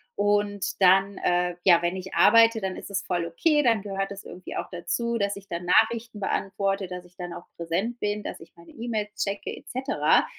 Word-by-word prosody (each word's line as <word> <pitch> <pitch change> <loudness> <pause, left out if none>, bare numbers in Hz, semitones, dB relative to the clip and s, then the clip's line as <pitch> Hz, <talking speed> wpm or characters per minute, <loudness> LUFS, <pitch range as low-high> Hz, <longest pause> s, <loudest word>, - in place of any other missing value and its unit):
Und 205 -1 0
dann, 195 +1 +5
äh, 175 0 +1
ja, 175 -3 +6
wenn 175 +2 0
ich 190 0 -7
arbeite, 230 0 +6
dann 190 -1 -2
ist - - -9
es 195 0 -1
voll 175 -2 -1
okay, 295 - +2
dann 230 -4 +3
gehört 195 -1 -3
es 200 0 -8
irgendwie 180 - -8
auch - - -3
dazu, 235 +7 -2
dass 200 0 0
ich 200 0 -12
dann 170 -1 -4
Nachrichten 225 +4 +2
beantworte, 195 0 -1
dass 180 0 -7
ich 175 0 -21
dann 175 -2 -6
auch 175 - -9
präsent 185 +9 -2
bin, 210 0 -2
dass - - -6
ich 165 - -14
meine 170 0 -16
E-Mails 220 -3 -4
checke 200 0 -3
et - - -15
cetera. 265 +3 +2
195 Hz, 210 wpm, -26 LUFS, 180-215 Hz, -, ja